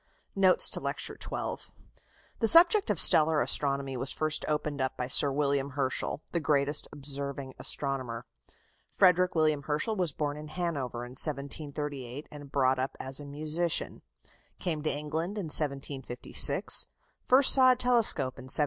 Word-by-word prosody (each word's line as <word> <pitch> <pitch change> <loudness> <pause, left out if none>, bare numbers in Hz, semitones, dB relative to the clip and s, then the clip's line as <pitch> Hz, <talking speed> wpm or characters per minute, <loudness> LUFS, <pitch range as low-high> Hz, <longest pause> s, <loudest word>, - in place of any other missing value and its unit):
NOTES 190 -2 +4
TO - - -1
LECTURE - - -5
XII - - -6 0.7
The 225 - +1
subject 345 - +5
of 205 -6 0
stellar 155 0 +6
astronomy 140 -2 0
was 130 +2 -3
first 155 0 0
opened 150 -2 -3
up 130 0 -3
by 125 - -3
Sir 135 +2 +7
William 140 -1 -2
Herschel, 135 +2 -3
the 170 - -1
greatest 145 -1 -1
observing 140 -1 -5
astronomer. 130 -5 0 0.6
Frederick 180 -1 +2
William 155 -2 +1
Herschel 155 +10 -3
was 180 -5 -1
born 145 0 -4
in 150 0 -9
Hanover 145 -8 -5
in 125 - -12
1738, 140 -1 -1
and 145 -2 -12
brought 130 -2 +1
up 130 +1 -4
as 130 +1 -2
a 145 - -10
musician. 155 +4 -1 0.6
Came 160 -4 -4
to 155 - -1
England 160 +7 -4
in 170 -7 -5
1756. 135 -4 +1 0.4
First 260 +2 +5
saw 255 -1 +6
a - - -5
telescope 230 - 0
in 130 - -11
1773. 130 - -1
145 Hz, 150 wpm, -28 LUFS, 135-160 Hz, 0.7 s, Sir